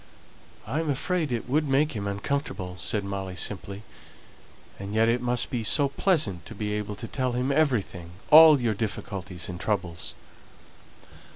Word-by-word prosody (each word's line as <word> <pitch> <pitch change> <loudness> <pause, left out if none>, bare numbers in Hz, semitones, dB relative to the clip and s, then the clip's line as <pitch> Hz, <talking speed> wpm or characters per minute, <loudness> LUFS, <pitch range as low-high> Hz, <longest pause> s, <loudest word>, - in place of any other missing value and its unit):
"I 150 - -2
am 160 -2 -2
afraid 155 +2 -1
it 120 -1 -3
would 150 +4 +1
make 140 +3 +2
him 100 -3 -4
uncomfortable," 100 -3 -3
said 100 +3 -1
Molly, 95 -2 -5
simply. 100 +2 -3 1.0
"And 100 +2 -6
yet 110 +1 +4
it 120 +1 +1
must 125 +2 0
be 120 -4 -2
so 140 +5 +3
pleasant 140 - 0
to 115 - -9
be 105 0 -3
able 105 0 -3
to 110 +3 -7
tell 130 -1 -2
him 125 +3 0
everything 120 - 0 0.2
all 155 -1 +9
your 120 -3 0
difficulties 100 -4 -5
and 90 -1 -6
troubles." 90 -6 -2
110 Hz, 160 wpm, -26 LUFS, 100-140 Hz, 1.0 s, all